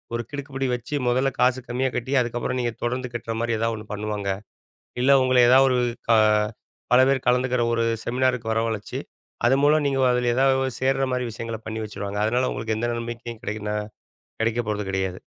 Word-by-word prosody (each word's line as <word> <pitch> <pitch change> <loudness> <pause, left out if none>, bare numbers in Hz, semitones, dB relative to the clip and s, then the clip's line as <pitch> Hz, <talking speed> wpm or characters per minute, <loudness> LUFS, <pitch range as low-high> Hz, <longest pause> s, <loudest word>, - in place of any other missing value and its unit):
ஒரு 115 - -2
கிடுக்குப்பிடி 135 -2 -3
வச்சு 125 +4 -5
முதல்ல 130 +3 +2
காசு 125 +1 +3
கம்மியா 130 +2 0
கட்டி, 125 +3 -2
அதுக்கப்பறம் 120 +1 -2
நீங்க 120 -1 -1
தொடர்ந்து 125 +1 -2
கட்றமாரி 115 0 -2
ஏதாவது 115 0 0
ஒன்னு 105 0 -10
பண்ணுவாங்க. 105 -1 -3 0.7
இல்ல 135 +2 +4
உங்கள 130 0 +2
ஏதாவது 135 +1 +7
ஒரு - - +2 0.3
க - - +6 0.8
பல 125 - +7
பேர் 135 -2 0
கலந்துக்கிற 125 0 +2
ஒரு 115 0 +1 0.2
செமினாருக்கு 125 -2 0
வரவழச்சி 110 -2 -2 0.5
அது 130 +2 +5
மூலம் 150 +1 +4
நீங்க 135 -1 +1
அதில 125 -1 +1
ஏதாவது 135 0 +2
சேர்றமாரி 130 -1 0
விஷயங்கள 115 0 -5
பண்ணி 110 +1 -4
வச்சிருவாங்க. 105 -1 -5
அதனால 125 +3 +1
உங்களுக்கு 110 0 -2
எந்த 120 +2 -1
நம்பிக்கைக்கும் 115 -1 -7
கிடைக்கனா 105 -1 -3 0.7
கிடைக்கப் 115 0 0
போறது 105 -1 -1
கிடையாது. 95 -1 -2
120 Hz, 165 wpm, -24 LUFS, 110-130 Hz, 0.8 s, ஏதாவது